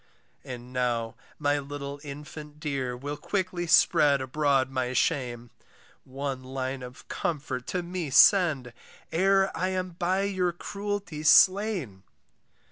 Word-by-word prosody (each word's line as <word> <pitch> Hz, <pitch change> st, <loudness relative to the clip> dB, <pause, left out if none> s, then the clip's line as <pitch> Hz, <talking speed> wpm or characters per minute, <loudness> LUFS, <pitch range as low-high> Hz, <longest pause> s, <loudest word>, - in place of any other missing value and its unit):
And 125 Hz, 0 st, -9 dB
now 120 Hz, -3 st, -1 dB, 0.2 s
my 145 Hz, -1 st, +1 dB
little 140 Hz, 0 st, -6 dB
infant 150 Hz, +1 st, -9 dB
dear 135 Hz, -5 st, -3 dB
Will 145 Hz, +3 st, -5 dB
quickly 185 Hz, -2 st, -2 dB
spread 145 Hz, -3 st, +5 dB
abroad 135 Hz, 0 st, +1 dB
my 130 Hz, -1 st, -2 dB
shame, 120 Hz, -3 st, -1 dB, 0.5 s
One 135 Hz, 0 st, -5 dB
line 130 Hz, 0 st, -4 dB
of 125 Hz, +2 st, -11 dB
comfort 135 Hz, -6 st, -3 dB
to 180 Hz, -1 st, -2 dB
me 175 Hz, -3 st, -4 dB
send, 145 Hz, -, +5 dB, 0.4 s
E'er 195 Hz, +3 st, +3 dB
I 185 Hz, -, -1 dB
am 185 Hz, -1 st, -2 dB
by 180 Hz, +3 st, 0 dB
your 185 Hz, -3 st, 0 dB
cruelty 200 Hz, -3 st, -5 dB
slain. 185 Hz, -, +4 dB
145 Hz, 125 wpm, -27 LUFS, 130-180 Hz, 0.5 s, spread